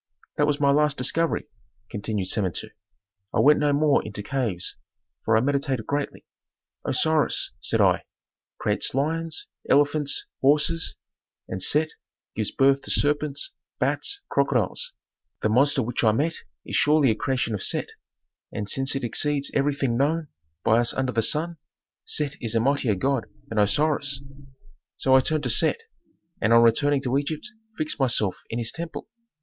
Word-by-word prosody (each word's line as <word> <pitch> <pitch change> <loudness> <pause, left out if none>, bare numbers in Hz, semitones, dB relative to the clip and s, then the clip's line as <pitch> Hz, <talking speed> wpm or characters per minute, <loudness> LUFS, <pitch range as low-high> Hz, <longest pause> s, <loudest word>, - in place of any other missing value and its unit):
"That 145 - +3
was 145 0 0
my 140 -1 +4
last 150 0 +2
discovery," 160 +6 0 0.5
continued 105 -2 -3
Samentu. 95 -5 0 0.6
"I - - +2
went 150 +1 +5
no 150 -1 +2
more 145 0 +3
into 105 -1 -6
caves, 115 -9 -2 0.5
for 110 0 +3
I - - +3
meditated 135 -3 -1
greatly. 145 +2 -3 0.6
'Osiris,' 155 -2 +1
said - - +1
I, - - +3 0.5
'creates - - 0
lions, 160 +3 -1 0.2
elephants, 145 0 +2 0.2
horses, 150 +4 +2 0.5
and 95 - -5
Set 155 +7 +3 0.4
gives 110 -2 0
birth 135 0 +3
to - - -10
serpents, 150 - 0 0.3
bats, 405 0 -1
crocodiles; - - 0 0.5
the 110 - +2
monster 135 +4 +3
which 120 +2 -2
I 110 -2 +4
met 155 +8 0 0.3
is - - -4
surely 150 -4 +4
a - - 0
creation 125 -1 -1
of 100 - -3
Set, - - 0 0.6
and 105 - -4
since 135 +5 +1
it 135 - -3
exceeds 140 +4 0
everything 140 -3 0
known 155 +3 0 0.3
by 115 +1 +4
us 120 0 +1
under 130 -1 0
the 115 - +1
sun, 160 +8 0 0.5
Set 145 -2 0
is 115 -1 0
a - - +4
mightier 130 -3 +1
god 135 +4 -1 0.2
than 110 - -1
Osiris.' 145 +5 +2 0.8
"So 130 0 +3
I - - +8
turned 155 +3 0
to 125 - +1
Set, 460 - +2 0.6
and 110 - +3
on 115 0 +7
returning 135 +4 +3
to 130 +1 +1
Egypt 155 +8 -4 0.3
fixed 155 -1 -2
myself 115 -7 +1
in 115 - -3
his 115 -1 -1
temple. 170 0 -7
140 Hz, 155 wpm, -25 LUFS, 115-150 Hz, 0.8 s, I